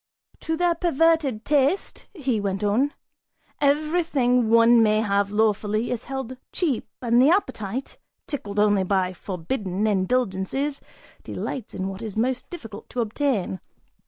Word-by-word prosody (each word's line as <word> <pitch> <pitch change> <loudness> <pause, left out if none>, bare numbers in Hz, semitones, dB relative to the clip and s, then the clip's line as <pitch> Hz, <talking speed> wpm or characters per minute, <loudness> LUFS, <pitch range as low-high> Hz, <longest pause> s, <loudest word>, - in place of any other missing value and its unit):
("To 320 0 -2
their 350 0 +3
perverted 325 -7 +1
taste," 290 +5 +1
he 270 - -1
went 195 0 -2
on,) 240 +8 +1 0.6
everything 285 -5 +2
one 230 +1 +6
may 215 -1 +4
have 200 -2 +1
lawfully 215 +1 +1
is 245 -2 -3
held 265 -2 -5
cheap 300 -10 -1 0.2
and 240 0 +4
the 270 - +6
appetite, 260 - -1 0.3
tickled 210 - -5
only 205 -1 +4
by 185 -1 0
forbidden 190 +2 -3
indulgences, 215 +6 0 0.4
delights 250 -6 -5
in 190 - -2
what 195 +2 -6
is 220 -2 -6
most 250 +2 -1
difficult 225 - -9
to 245 - -2
obtain. 225 -5 -1
235 Hz, 130 wpm, -24 LUFS, 205-280 Hz, 0.6 s, one